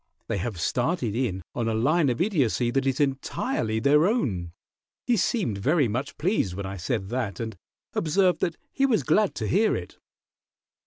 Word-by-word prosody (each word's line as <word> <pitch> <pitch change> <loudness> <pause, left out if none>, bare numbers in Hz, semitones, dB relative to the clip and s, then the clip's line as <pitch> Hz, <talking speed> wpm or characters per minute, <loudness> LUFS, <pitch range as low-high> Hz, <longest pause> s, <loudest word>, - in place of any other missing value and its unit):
They - - -1
have 100 -2 -4
started 125 - 0
in 105 -8 -1
on 115 -2 -1
a 110 - 0
line 145 +6 +3
of 120 - -1
Idiocy 135 - +1
that 135 +2 0
is 135 -1 0
entirely 130 -5 -1
their 150 +7 +4
own. 100 - -1 0.5
He 245 - +3
seemed 180 - 0
very 145 - +3
much 125 +6 -3
pleased 155 - 0
when 100 0 -4
I 95 +1 -5
said 95 +2 -2
that, 115 -6 -2
and 110 -2 -4 0.4
observed 180 +3 +2
that 170 - -1
he 275 0 +2
was 230 -5 +2
glad 210 -2 +2
to - - -2
hear 215 +4 +3
it." - - -7
130 Hz, 175 wpm, -26 LUFS, 110-170 Hz, 0.5 s, their